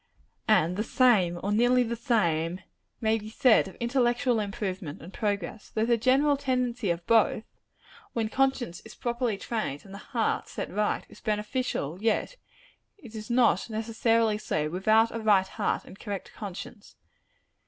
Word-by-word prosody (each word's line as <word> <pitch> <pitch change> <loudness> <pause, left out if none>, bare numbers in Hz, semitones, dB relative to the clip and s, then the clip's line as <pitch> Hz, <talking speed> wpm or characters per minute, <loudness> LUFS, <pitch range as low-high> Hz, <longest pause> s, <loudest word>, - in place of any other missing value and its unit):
And 180 -4 +3
the 215 - 0
same, 210 -9 +3
or 200 - -1
nearly 245 +4 +4
the 235 0 -3
same, 180 - 0 0.4
may 220 0 +2
be 215 0 -9
said 225 -1 +4
of 190 - -11
intellectual 240 0 +1
improvement 190 -6 -4
and 180 +4 -11
progress. 205 -1 -3
Though 220 0 0
the 235 0 +3
general 270 +5 +3
tendency 250 -5 -1
of 170 0 -2
both 225 -1 +3 0.7
when 225 -2 0
conscience 255 -7 0
is 220 - -12
properly 240 -3 -1
trained 210 -10 -4
and 195 - -12
the 200 - -8
heart 230 0 -1
set - - -5
right 210 +2 -1
is - - -16
beneficial, 210 - -2
yet 225 - 0 0.6
it 240 - -13
is 215 +1 -7
not 240 -1 +3
necessarily 225 0 +1
so, 150 -7 -1
without 220 +5 +3
a - - -2
right 205 -4 +3
heart - - -2
and 195 - -13
correct 200 -3 -6
conscience. 200 +1 -9
220 Hz, 155 wpm, -28 LUFS, 195-240 Hz, 0.7 s, nearly